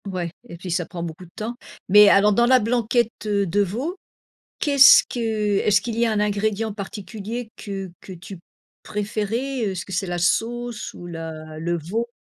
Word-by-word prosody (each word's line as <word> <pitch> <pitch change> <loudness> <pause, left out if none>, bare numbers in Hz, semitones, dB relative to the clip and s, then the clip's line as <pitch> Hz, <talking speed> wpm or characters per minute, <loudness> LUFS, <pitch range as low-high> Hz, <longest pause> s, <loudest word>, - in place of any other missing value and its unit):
Ouais. 180 -3 -3 0.2
Et 170 - -8
puis 180 +1 -7
ça 175 0 0
prend 170 0 -7
beaucoup 170 +2 -7
de 170 - -20
temps. 220 +2 -4 0.3
Mais 210 +1 +8
alors 205 +1 +5
dans 235 +3 +3
la 260 0 +6
blanquette, 235 +1 +1
heu, 200 -1 +1
de 195 +3 +1
veau, 245 - -2 0.6
qu'est-ce 280 -2 +7
que 245 - -4 0.4
est-ce 205 -2 +3
qu'il 230 0 -4
y 235 - +3
a 225 - +1
un 215 - 0
ingrédient 210 +1 0
particulier 215 +3 -6
que 195 -2 -6
que 190 - -9
tu 185 +2 -10 0.5
préférais, 220 +5 -2
heu, 200 - -1
est-ce 185 -2 -4
que - - -11
c'est 185 +2 -1
la 175 0 -2
sauce 235 +5 -1
ou 175 - -10
la 160 -2 -7
le 170 +2 -1
veau? 205 +9 -3
205 Hz, 190 wpm, -23 LUFS, 180-230 Hz, 0.6 s, Mais